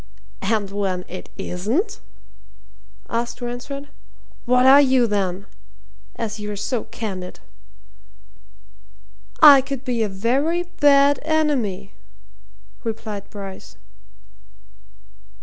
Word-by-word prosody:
"And 205 Hz, -1 st, -1 dB
when 190 Hz, -3 st, -2 dB
it 185 Hz, -, -9 dB
isn't?" 265 Hz, -, -2 dB, 1.1 s
asked 235 Hz, +1 st, -3 dB
Ransford. 255 Hz, +4 st, -6 dB, 0.6 s
"What 250 Hz, +1 st, +3 dB
are 275 Hz, +2 st, +8 dB
you 260 Hz, -3 st, +4 dB
then? 200 Hz, -3 st, -2 dB, 0.7 s
as 220 Hz, -1 st, -4 dB
you're 210 Hz, 0 st, -5 dB
so 225 Hz, +4 st, -3 dB
candid." 190 Hz, -5 st, -6 dB, 2.0 s
"I 285 Hz, -3 st, +10 dB
could 275 Hz, -1 st, -6 dB
be 245 Hz, -3 st, -1 dB
a 215 Hz, -, 0 dB
very 270 Hz, -, 0 dB
bad 285 Hz, -4 st, +4 dB
enemy," 285 Hz, -12 st, 0 dB, 0.9 s
replied 215 Hz, -3 st, -5 dB
Bryce. 195 Hz, -2 st, -9 dB
235 Hz, 90 wpm, -22 LUFS, 200-275 Hz, 2.0 s, I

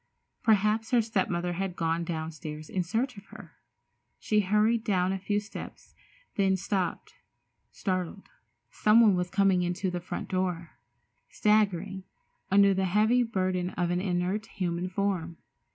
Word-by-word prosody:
Perhaps 215 Hz, 0 st, +2 dB
her 245 Hz, -2 st, +4 dB
step 215 Hz, -4 st, 0 dB
mother 175 Hz, 0 st, -1 dB
had 185 Hz, 0 st, -3 dB
gone 165 Hz, 0 st, 0 dB
downstairs 160 Hz, -2 st, -6 dB
in 185 Hz, -, 0 dB
search 225 Hz, +7 st, -2 dB
of 200 Hz, -, -11 dB
her. -, -, -12 dB, 0.7 s
She 215 Hz, -, +1 dB
hurried 210 Hz, +3 st, +2 dB
down 185 Hz, -3 st, +1 dB
a 195 Hz, -, -2 dB
few 205 Hz, +2 st, 0 dB
steps, 210 Hz, +1 st, -10 dB, 0.4 s
then 190 Hz, -1 st, +3 dB
stopped, 185 Hz, -2 st, -2 dB, 0.6 s
startled. 185 Hz, 0 st, -3 dB, 0.4 s
Someone 215 Hz, -1 st, +5 dB
was 180 Hz, 0 st, -1 dB
coming 195 Hz, -2 st, +3 dB
into 180 Hz, +1 st, -1 dB
the 180 Hz, -, -3 dB
front 175 Hz, -, -5 dB
door, 180 Hz, -3 st, -2 dB, 0.6 s
staggering 200 Hz, -3 st, +1 dB, 0.5 s
under 200 Hz, 0 st, +5 dB
the 190 Hz, 0 st, 0 dB
heavy 215 Hz, +6 st, +3 dB
burden 185 Hz, -5 st, -1 dB
of 175 Hz, -1 st, 0 dB
an 175 Hz, +1 st, 0 dB
inert, 185 Hz, +3 st, -1 dB
human 180 Hz, -2 st, -3 dB
form. 185 Hz, -4 st, -2 dB
190 Hz, 140 wpm, -28 LUFS, 175-210 Hz, 0.7 s, Someone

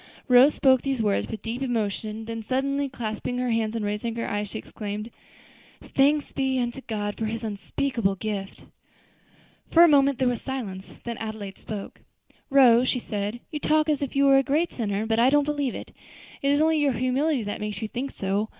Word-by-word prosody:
Rose 255 Hz, +3 st, +6 dB
spoke 260 Hz, -2 st, +4 dB
these 270 Hz, -2 st, -2 dB
words 205 Hz, -2 st, +1 dB
with 220 Hz, -, -7 dB
deep 235 Hz, +3 st, -4 dB
emotion, 220 Hz, -3 st, -2 dB
then 225 Hz, 0 st, -5 dB
suddenly 275 Hz, +4 st, -1 dB
clasping 240 Hz, 0 st, -4 dB
her 250 Hz, -1 st, 0 dB
hands 225 Hz, -1 st, 0 dB
and 220 Hz, -2 st, -2 dB
raising 210 Hz, +3 st, -2 dB
her 230 Hz, -, -3 dB
eyes, 205 Hz, 0 st, -2 dB
she -, -, -6 dB
exclaimed, 210 Hz, +1 st, -6 dB, 0.7 s
"'Thanks 285 Hz, +2 st, +1 dB
be 265 Hz, -1 st, 0 dB
unto 240 Hz, +2 st, -2 dB
God 205 Hz, -4 st, -3 dB
for 225 Hz, -, -1 dB
His 225 Hz, +1 st, -4 dB
unspeakable 215 Hz, 0 st, -1 dB
gift!'" 195 Hz, -1 st, -5 dB, 1.0 s
For 335 Hz, -, +7 dB
a -, -, +8 dB
moment 280 Hz, -3 st, +4 dB
there 255 Hz, -, +1 dB
was 245 Hz, -1 st, -1 dB
silence. 210 Hz, -8 st, -5 dB
Then 235 Hz, -2 st, -5 dB
Adelaide 215 Hz, -3 st, -6 dB
spoke: 205 Hz, -2 st, -7 dB, 0.5 s
"Rose," 255 Hz, -2 st, +5 dB
said 210 Hz, -1 st, -3 dB
she, 240 Hz, -, -12 dB
"you 300 Hz, -, -3 dB
talk 310 Hz, +1 st, +2 dB
as 295 Hz, -2 st, +1 dB
if 280 Hz, -2 st, -3 dB
you 280 Hz, 0 st, +4 dB
were 275 Hz, 0 st, +6 dB
a -, -, +5 dB
great 305 Hz, +6 st, 0 dB
sinner; 210 Hz, -2 st, -2 dB
but 225 Hz, 0 st, +1 dB
I 245 Hz, +2 st, +6 dB
don't 290 Hz, +1 st, +4 dB
believe 290 Hz, -4 st, -1 dB
it; -, -, -8 dB, 0.5 s
it 275 Hz, -, +1 dB
is 285 Hz, +1 st, +3 dB
only 315 Hz, 0 st, +3 dB
your 285 Hz, -3 st, +2 dB
humility 255 Hz, +3 st, 0 dB
that 205 Hz, 0 st, -5 dB
makes 210 Hz, -1 st, -4 dB
you 220 Hz, -, -3 dB
think 250 Hz, +5 st, -4 dB
so. 200 Hz, +1 st, -2 dB
240 Hz, 200 wpm, -25 LUFS, 215-275 Hz, 1.0 s, a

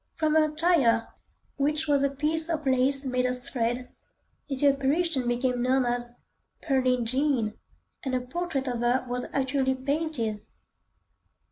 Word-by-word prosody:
From 310 Hz, -2 st, +1 dB
her 310 Hz, -1 st, +3 dB
attire, 300 Hz, -8 st, +2 dB, 0.5 s
which 300 Hz, +2 st, 0 dB
was 285 Hz, -2 st, +3 dB
a 280 Hz, -, +2 dB
piece 310 Hz, +4 st, -1 dB
of 310 Hz, -3 st, -2 dB
lace 265 Hz, +1 st, +3 dB
made 255 Hz, -1 st, +1 dB
of 250 Hz, 0 st, -4 dB
thread, 245 Hz, -1 st, -2 dB, 0.6 s
the 275 Hz, +1 st, +2 dB
apparition 275 Hz, 0 st, +1 dB
became 245 Hz, 0 st, 0 dB
known 255 Hz, +1 st, +2 dB
as 240 Hz, 0 st, -2 dB, 0.5 s
"Pearlin' 255 Hz, -4 st, +1 dB
Jean," 255 Hz, -3 st, 0 dB, 0.5 s
and 265 Hz, -2 st, -1 dB
a 250 Hz, -, 0 dB
portrait 275 Hz, 0 st, -3 dB
of 245 Hz, -2 st, -2 dB
her 245 Hz, +2 st, +1 dB
was 245 Hz, 0 st, -3 dB
actually 265 Hz, -1 st, 0 dB
painted. 260 Hz, -6 st, -2 dB
265 Hz, 140 wpm, -27 LUFS, 250-295 Hz, 0.6 s, her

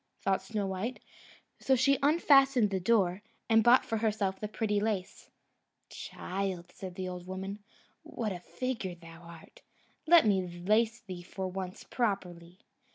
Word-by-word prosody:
thought 195 Hz, -1 st, 0 dB
Snowdrop; 200 Hz, +3 st, -3 dB, 0.6 s
so 265 Hz, -, +3 dB
she 265 Hz, +2 st, +3 dB
unfastened 275 Hz, -6 st, +4 dB
the 190 Hz, -, 0 dB
door, 190 Hz, -2 st, +2 dB, 0.3 s
and 225 Hz, -1 st, +5 dB
bought 240 Hz, +3 st, +6 dB
for 225 Hz, -, -1 dB
herself 210 Hz, -3 st, -1 dB
the 210 Hz, -, -3 dB
pretty 210 Hz, -1 st, -1 dB
lace. 205 Hz, -3 st, -3 dB, 0.6 s
"Child," 185 Hz, -2 st, -5 dB
said 185 Hz, -1 st, -8 dB
the 185 Hz, 0 st, -4 dB
old 180 Hz, -1 st, -7 dB
woman, 190 Hz, +2 st, -5 dB, 0.4 s
"what 220 Hz, -3 st, -4 dB
a 180 Hz, -, -5 dB
figure 225 Hz, -2 st, -4 dB
thou 165 Hz, -1 st, -14 dB
art! 170 Hz, -1 st, -14 dB, 0.5 s
Let 335 Hz, -3 st, +7 dB
me 200 Hz, -3 st, +3 dB, 0.2 s
lace 225 Hz, +3 st, +2 dB
thee 185 Hz, -5 st, -8 dB
for 190 Hz, +2 st, -6 dB
once 185 Hz, 0 st, -6 dB
properly." 180 Hz, -6 st, -3 dB
200 Hz, 145 wpm, -31 LUFS, 185-230 Hz, 0.6 s, Let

